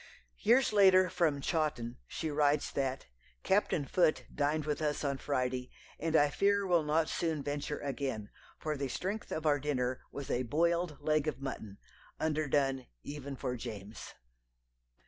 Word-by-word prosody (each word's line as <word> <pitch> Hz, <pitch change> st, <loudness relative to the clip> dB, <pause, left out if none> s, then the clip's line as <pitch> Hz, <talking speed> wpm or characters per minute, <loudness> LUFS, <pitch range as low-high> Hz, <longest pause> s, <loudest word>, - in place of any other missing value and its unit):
Years 240 Hz, +2 st, +4 dB
later, 185 Hz, -3 st, +6 dB
from 160 Hz, -6 st, +1 dB
Chawton, 135 Hz, -7 st, -1 dB
she 160 Hz, -2 st, -3 dB
writes 145 Hz, 0 st, +2 dB
that: 135 Hz, -1 st, -2 dB, 0.4 s
"Captain 190 Hz, -6 st, +2 dB
Foote 160 Hz, +1 st, +2 dB
dined 150 Hz, +1 st, 0 dB
with 150 Hz, 0 st, -1 dB
us 150 Hz, -1 st, 0 dB
on 140 Hz, -2 st, -1 dB
Friday, 125 Hz, -2 st, -1 dB, 0.3 s
and 165 Hz, 0 st, 0 dB
I 145 Hz, -2 st, +5 dB
fear 200 Hz, +2 st, +2 dB
will 175 Hz, -3 st, +4 dB
not 155 Hz, +1 st, +1 dB
soon 160 Hz, -4 st, -1 dB
venture 145 Hz, +1 st, -3 dB
again, 135 Hz, -6 st, -3 dB, 0.3 s
for 155 Hz, -1 st, -2 dB
the 140 Hz, -1 st, -2 dB
strength 195 Hz, -, -4 dB
of 160 Hz, -, -3 dB
our 145 Hz, -1 st, +4 dB
dinner 130 Hz, -3 st, -1 dB
was 140 Hz, -2 st, -5 dB
a 125 Hz, -, +1 dB
boiled 170 Hz, +4 st, +1 dB
leg 155 Hz, 0 st, +1 dB
of 140 Hz, -4 st, -2 dB
mutton, 110 Hz, -7 st, -6 dB, 0.4 s
underdone 145 Hz, -4 st, +1 dB, 0.2 s
even 140 Hz, -1 st, -6 dB
for 125 Hz, -1 st, -3 dB
James." 105 Hz, -2 st, -8 dB
145 Hz, 150 wpm, -33 LUFS, 135-160 Hz, 0.4 s, later